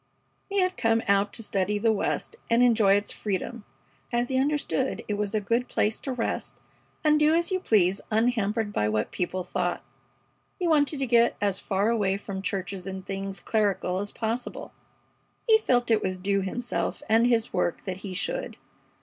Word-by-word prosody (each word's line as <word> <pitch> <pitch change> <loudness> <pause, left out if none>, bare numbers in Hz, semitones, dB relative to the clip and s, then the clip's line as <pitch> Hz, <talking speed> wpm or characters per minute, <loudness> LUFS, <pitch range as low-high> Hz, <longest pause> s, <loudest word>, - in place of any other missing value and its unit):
He 400 -1 +1
had 370 0 0
come 225 -2 +2
out 200 0 +3
to 225 - -6
study 205 0 0
the 225 +2 +3
West 215 - -1
and 230 +1 +4
enjoy 220 -5 +5
its 205 0 -1
freedom, 210 +2 -4 0.5
as 240 0 0
he 260 -1 +1
understood 275 -1 0
it 210 - -1
was 205 0 -2
a - - +3
good 230 +5 0
place 215 +1 0
to 270 - -3
rest 245 -3 -3 0.5
and 305 -1 +4
do 305 +1 +4
as 340 +2 0
you 375 - +1
please 195 - +2
unhampered 220 -2 +1
by 105 - +1
what 105 0 -1
people 180 +1 -2
thought. - - -2 0.7
He 360 - -1
wanted 300 -2 +3
to 270 - 0
get 235 -1 +3
as 200 -2 0
far 200 +2 0
away 200 -4 +1
from 200 -1 -6
churches 195 -1 -4
and 190 -1 -6
things 195 -1 -5
clerical 195 -3 0
as 205 +1 -4
possible. 230 +2 -4 0.7
He 440 -1 +6
felt 245 - +1
it 220 -1 +4
was 185 -1 -2
due 195 +2 0
himself 235 +6 -2
and 225 +2 +4
his 230 -2 +1
work 180 -2 0
that 185 -2 -4
he 190 -1 -7
should. - - -3
215 Hz, 185 wpm, -27 LUFS, 195-245 Hz, 0.7 s, He